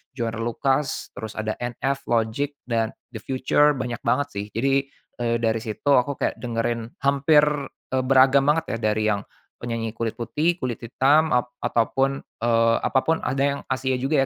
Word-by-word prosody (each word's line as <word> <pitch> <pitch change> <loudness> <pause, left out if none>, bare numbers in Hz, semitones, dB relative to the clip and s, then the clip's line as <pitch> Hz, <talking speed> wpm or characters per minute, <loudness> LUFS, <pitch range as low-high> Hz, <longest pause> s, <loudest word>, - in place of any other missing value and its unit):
Joyner 115 -3 -3
Lucas, 135 +4 -1
terus 110 +1 -6
ada 110 0 -2
NF, 135 +3 -2
Logic 115 +5 +1 0.2
dan 115 -2 0 0.2
The 110 - -7
Future, 135 +3 +3
banyak 125 -2 -4
banget 130 +5 +1
sih. 100 0 -3
Jadi, 135 +3 +1 0.3
eee, 120 -1 +1
dari 115 -1 +1
situ 110 +6 -1
aku 135 +3 +2
kayak - - 0
dengerin 115 -1 -2 0.2
hampir, 140 +2 +4 0.5
eee, 130 0 +1
beragam 135 +1 +5
banget 150 -4 +1
ya - - -3
dari 110 0 -1
yang 100 - 0 0.4
penyanyi 115 -2 -4
kulit 115 +1 -3
putih, 155 - 0
kulit 125 -2 -2
hitam, 145 +7 +3
ap 125 0 +2 0.2
ataupun, 135 +4 +1 0.2
eee, 115 -1 +3
apapun 160 +5 +1
ada 135 +1 0
yang - - -7
Asia 130 0 0
juga 135 +4 +1
125 Hz, 165 wpm, -24 LUFS, 115-135 Hz, 0.5 s, beragam